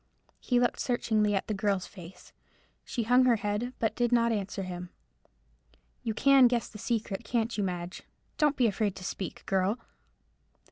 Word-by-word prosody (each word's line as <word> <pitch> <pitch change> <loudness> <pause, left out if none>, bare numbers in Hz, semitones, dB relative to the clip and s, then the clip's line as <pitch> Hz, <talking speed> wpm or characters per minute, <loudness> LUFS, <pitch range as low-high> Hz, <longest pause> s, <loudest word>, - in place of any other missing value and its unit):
He 245 -1 +1
looked 245 - +1
searchingly 215 -4 +1
at 195 - -1
the 215 - -2
girl's 195 -2 0
face. 180 -1 -13 0.5
She 235 - -3
hung 250 +3 +5
her 245 -2 +5
head, 210 +3 -2
but 225 - 0
did 240 -1 +1
not 235 -1 +3
answer 200 -2 -2
him. 180 -1 -6 1.1
"You 225 -3 -3
can 275 -1 +6
guess 240 -1 0
the 210 - -11
secret, 225 -2 -2
can't 230 0 -1
you, 205 - 0
Madge? 180 -1 -4 0.4
Don't 295 -1 +3
be 250 - +3
afraid 205 -2 0
to 185 - -9
speak, 185 0 -5
girl." 195 +3 +1
215 Hz, 170 wpm, -29 LUFS, 195-240 Hz, 1.1 s, can